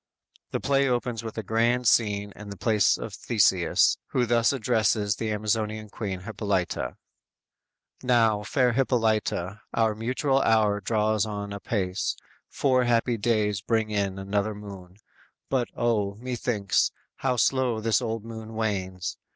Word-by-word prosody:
The - - -2
play 140 0 +2
opens 120 -2 -1
with 110 0 -7
a 110 - -2
grand 115 +4 +1
scene 105 -3 +2
in 105 0 -10
the 100 - -8
palace 105 -2 +3
of - - -7
Theseus, - - +3
who 125 - +1
thus 115 0 +3
addresses 110 -5 +1
the 110 - -2
Amazonian 110 0 -2
Queen 95 -4 -4
Hippolyta: 100 -3 -2 1.0
_"Now, 115 -4 +3
fair 125 +3 +1
Hippolyta, 110 -6 0
our 110 -1 +2
mutual 130 +5 0
hour 105 -3 +3
Draws 110 0 +1
on 100 -1 -5
apace, 100 -2 -2 0.3
four 130 -3 +2
happy 120 0 +2
days 105 -2 +1
bring 110 -1 0
in, 100 -2 -1
Another 100 +2 -1
moon; 95 -3 -10 0.5
but, 130 -3 +1
O, 105 -4 +1
methinks, 115 -3 0 0.3
how 130 -2 0
slow 125 -1 +2
This 115 +3 +2
old 115 -2 -3
moon 110 -1 -8
wanes! 95 -5 -2
110 Hz, 135 wpm, -26 LUFS, 105-120 Hz, 1.0 s, palace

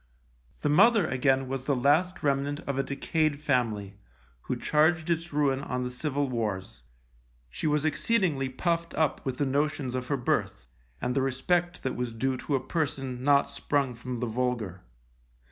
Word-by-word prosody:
The 150 - +1
mother, 200 +8 +5
again, 135 0 +1
was 135 0 -4
the 140 - +2
last 155 +9 +2
remnant 140 +1 0
of 140 -1 -3
a - - +5
decayed 145 +2 0
family, 110 -9 -1 0.4
who - - -3
charged 160 +2 +2
its 165 +1 -1
ruin 140 -2 +1
on 125 -2 -3
the 125 - -3
Civil 145 +2 -1
Wars. 105 - -3 0.7
She 110 - -2
was 150 0 +1
exceedingly 155 -4 +1
puffed 170 +5 -1
up 155 -3 +1
with 130 -2 -3
the 145 - +1
notions 140 -1 0
of 130 0 -3
her 140 - 0
birth, 90 - -1 0.3
and 125 - -1
the 135 - +1
respect 175 +7 0
that 130 - -2
was 120 -2 -3
due 130 +3 0
to 140 - -1
a - - +2
person 135 -6 -2
not 140 0 +4
sprung 140 -4 -1
from 125 +1 -6
the 125 - 0
vulgar. 115 -6 -2
135 Hz, 170 wpm, -28 LUFS, 125-150 Hz, 0.7 s, mother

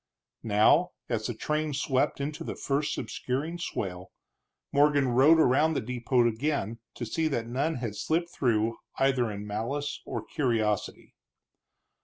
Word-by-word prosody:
Now, 110 +12 +4 0.2
as 110 -3 -1
the 120 - -4
train 150 +4 -1
swept 135 -1 0
into 145 +2 -4
the - - -5
first 140 +1 -1
obscuring 135 +8 -3
swale, 95 - -4 0.6
Morgan 145 -2 +4
rode 135 +7 +6
around 155 +3 +4
the - - +2
depot 120 +1 +1
again 115 -2 -1 0.2
to 120 - -4
see 160 +8 0
that 120 -7 -1
none 140 +7 -1
had 115 -4 -4
slipped 165 +10 -1
through 115 -3 +1 0.2
either 130 -3 +2
in 105 0 -6
malice 130 +7 -3
or 110 -2 -5
curiosity. 110 -7 -1
130 Hz, 140 wpm, -28 LUFS, 115-145 Hz, 0.6 s, rode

